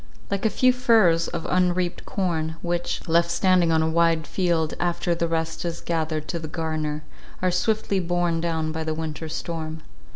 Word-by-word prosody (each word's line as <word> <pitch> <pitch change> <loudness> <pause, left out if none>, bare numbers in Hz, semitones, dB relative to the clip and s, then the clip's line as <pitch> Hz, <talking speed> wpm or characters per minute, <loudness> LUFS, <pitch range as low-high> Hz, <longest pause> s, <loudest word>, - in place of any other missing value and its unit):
Like 200 +2 +1
a - - +2
few 255 +3 +4
furrows 220 -10 +4
of 170 -2 -4
unreaped 180 -1 0
corn, 160 -5 -1
which, 175 0 -2
left 170 +1 +3
standing 180 -1 +3
on 160 0 +3
a - - +1
wide 165 -1 +2
field 170 -4 0
after 175 0 0
the 170 0 0
rest 165 0 -2
is 170 -1 -3
gathered 155 -2 -2
to 170 - -2
the 160 - -6
garner, 155 -1 -3 0.4
are 185 0 +1
swiftly 200 +2 +1
borne 175 -1 0
down 160 -2 -1
by 160 0 -3
the 155 0 -2
winter 160 0 -4
storm. 160 -1 -5
170 Hz, 175 wpm, -24 LUFS, 160-175 Hz, 0.4 s, few